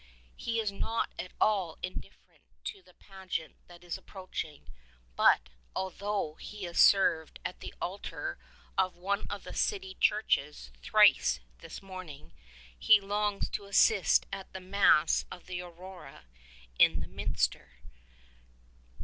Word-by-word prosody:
He 230 0 -2
is 215 -3 0
not 225 +3 -2
at 180 - -5
all 195 -6 +2
indifferent 185 - -8 0.2
to 395 - -6
the - - -22
pageant 190 -5 -6
that 175 0 -15
is 175 - -5
approaching; 185 -6 -7 0.5
but, 60 - +4 0.3
although 195 -3 -2
'he 210 -1 -8
has 175 -1 -3
served 170 -5 +5
at - - -4
the - - -7
altar 390 - -5 0.4
of 185 -1 +2
one 200 +3 -2
of - - -6
the - - -8
city 385 -2 -1
churches 150 - +1
thrice 60 0 +5 0.2
this - - -9
morning, 180 - -9 0.5
he 210 -1 +7
longs 205 0 -1
to 200 - -4
assist 200 - +4
at 195 -1 -6
the 190 - -5
Mass 185 -4 +4
of 180 - -10
the 180 -1 -4
Aurora 175 - -11 0.5
in - - +6
the - - -5
minster. 60 - -2
190 Hz, 130 wpm, -31 LUFS, 170-205 Hz, 0.5 s, he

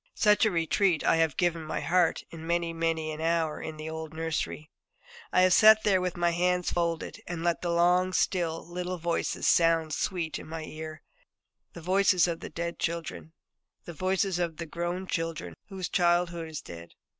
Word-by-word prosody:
Such 210 -1 +4
a - - +4
'retreat' 170 0 +1
I - - +3
have 160 -3 +1
given 170 -2 +1
my 155 - -3
heart 175 -1 +1
in 165 -1 -9
many 170 0 0
and 165 - -10
many 165 -1 0
an 155 0 -6
hour 165 -1 0
in 160 -1 -6
the 155 +1 -6
old 160 0 -6
nurseries. 160 -1 -3 0.7
I - - +4
have 185 -1 +5
sat 215 +1 +7
there 190 -3 +3
with 180 -1 -3
my 175 0 +2
hands 180 +1 +1
folded, 170 -1 -2
and 170 -1 -4
let 170 -1 0
the 175 - -2
long 180 +2 +3
still 170 -3 0
little 180 +1 -4
voices 170 0 -1
sound 165 -2 +3
sweet 170 -2 -2
in - - -10
my 160 0 -6
ear 155 0 -8 0.7
the 170 - -9
voices 185 +1 +3
of 165 -1 -3
the - - -7
dead 170 0 -5
children, 90 - -4 0.5
the 170 - -7
voices 185 +1 0
of 170 -3 -2
the 170 - -5
grown 175 +3 -3
children 165 - -3 0.2
whose 190 -2 -4
childhood 175 -1 +1
is 155 - -6
dead. 85 0 -11
170 Hz, 190 wpm, -28 LUFS, 160-180 Hz, 0.7 s, sat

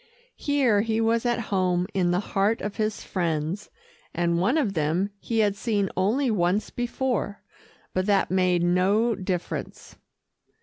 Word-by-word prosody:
Here 265 -8 +2
he 220 0 0
was 230 +1 +2
at 240 -1 +1
home 180 -2 +2
in 180 -2 +1
the 175 +1 +2
heart 200 +3 +2
of 205 -1 -4
his 215 -1 -1
friends, 170 +2 -2 0.5
and 170 0 +1
one 215 - +2
of 240 -11 +1
them 170 +5 0
he 230 - -3
had 205 -2 +2
seen 205 -3 -1
only 230 +8 +1
once 190 +1 0
before. 245 -4 -2 0.5
But 185 +1 0
that 200 -3 +2
made 180 -2 +2
no 195 +7 +3
difference. 185 -3 -5
200 Hz, 145 wpm, -25 LUFS, 180-225 Hz, 0.5 s, no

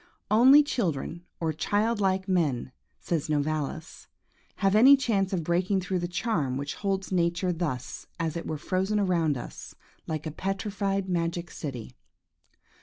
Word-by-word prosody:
"Only 260 +7 +8
children, 175 - -2
or 160 -2 -1
child 210 +7 0
like 190 0 +1
men," 150 -10 0 0.3
says 160 -3 -2
Novalis, 155 +1 -2 0.5
"have 195 -1 +1
any 260 +6 +8
chance 205 -7 0
of 180 -4 -1
breaking 180 +4 +1
through 185 0 -2
the 175 - -2
charm 170 - -1
which 140 +1 -3
holds 195 -2 -2
nature 175 0 +1
thus 150 -7 -4
as 165 -1 -1
it 170 - -4
were 155 - -3
frozen 190 +7 0
around 170 -7 +1
us, - - -9 0.3
like 155 -1 -3
a 155 - -3
petrified 195 +2 -2
magic 170 -1 -2
city." 125 - -6
175 Hz, 145 wpm, -27 LUFS, 155-195 Hz, 0.5 s, Only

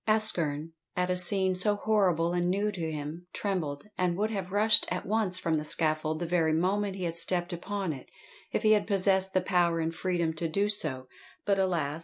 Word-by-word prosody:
ASKERN, 165 -8 +1 0.2
at 180 0 0
a - - +1
scene 190 +1 +3
so 205 +3 +1
horribie 180 -6 +1
and 175 0 0
new 200 +3 0
to 165 -5 -4
him, 155 +4 -7
trembled, 165 -8 -3 0.2
and 180 -1 0
would 215 +2 -1
have 190 -3 -4
rushed 210 +2 +5
at 180 - -3
once 205 -3 +1
from 165 -3 -1
the - - -5
scaffold 155 0 +1
the 175 - -3
very 165 -2 +1
moment 190 +4 0
he 190 - -6
had 170 -1 -3
stepped 175 +1 +1
upon 190 0 -4
it, 130 - -11 0.4
if - - -2
he 215 - +4
had 210 -1 +3
possessed 190 -1 +2
the 185 - +3
power 175 -2 +1
and 165 0 -2
freedom 170 -2 -1
to 165 +1 -3
do 200 +5 0
so; 130 -11 0 0.4
but 200 -1 +1
alas! 165 -5 -1
180 Hz, 205 wpm, -28 LUFS, 165-200 Hz, 0.4 s, rushed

